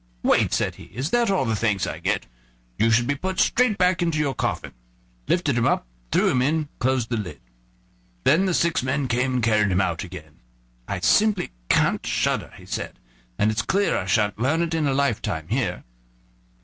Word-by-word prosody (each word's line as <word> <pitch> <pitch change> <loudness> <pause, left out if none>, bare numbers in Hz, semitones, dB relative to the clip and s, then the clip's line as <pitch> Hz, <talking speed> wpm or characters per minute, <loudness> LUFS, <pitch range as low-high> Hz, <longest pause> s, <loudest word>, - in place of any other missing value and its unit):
"What!" - - +3
said - - 0
he, - - -11
"is 130 - -5
that 240 -2 +2
all 190 -8 +1
the 110 -2 0
thanks 105 -3 0
I - - -5
get? - - -1 0.5
You 115 - +4
should 115 +1 +3
be 145 - +1
put 185 +6 -4
straight 245 -4 +3
back 180 -1 +2
into 165 -2 0
your 145 -3 0
coffin," 65 - -3 0.6
lifted 155 -7 +1
him 120 -1 +2
up, - - +1 0.3
threw - - +3
him 125 - +2
in, 145 +5 +2
and 155 -2 -5
closed 130 -2 0
the 120 - -1
lid. 90 -9 -6 0.8
Then 175 +7 +4
the 180 - +1
six 170 -1 +2
men 130 +2 -1
came 125 +2 0
and 125 - 0
carried 105 -3 +3
him 90 - +2
out 85 -4 0
again. 85 -4 -11 0.5
"I - - -3
simply 210 - +3 0.2
can't - - +2
shudder," - - -1
he - - -14
said, - - -5 0.4
"and 105 - +2
it's 110 0 0
clear 200 - +1
I - - -2
sha'n't 105 -2 +1
learn 150 +8 +1
it 165 -1 -3
in 160 -2 +1
a 135 - +1
lifetime 140 -5 -1
here." - - -1
130 Hz, 200 wpm, -24 LUFS, 110-165 Hz, 0.8 s, You